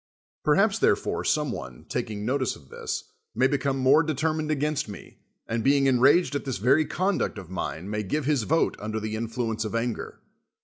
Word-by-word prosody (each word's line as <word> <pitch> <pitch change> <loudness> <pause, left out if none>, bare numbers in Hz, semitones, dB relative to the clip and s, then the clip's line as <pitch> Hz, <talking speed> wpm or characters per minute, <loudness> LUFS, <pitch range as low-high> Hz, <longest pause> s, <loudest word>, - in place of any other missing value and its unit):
Perhaps, - - +3
therefore, - - +1
some - - +1
one, 65 -1 -8
taking 105 -1 -3
notice 130 +1 0
of 70 -2 -17
this, - - -4 0.3
may 130 +4 +3
become 135 0 +1
more 135 +4 +5
d' 155 -2 -1
termined 155 0 0
against 150 -4 0
me, 100 - -11 0.3
and, 115 0 -2
being 140 0 +4
enraged 135 +6 +4
at 145 - -2
this 135 -3 -3
very 135 +10 +3
conduct 190 - 0
of 95 -3 -9
mine, 90 -1 -4
may 105 +1 -2
give 140 +8 -2
his 145 -3 +2
vote 160 +9 +1
undi'i 110 +1 -3
the 110 0 -3
influence 115 0 -2
of 110 +1 -4
anger. 115 0 -3
130 Hz, 185 wpm, -26 LUFS, 110-145 Hz, 0.3 s, more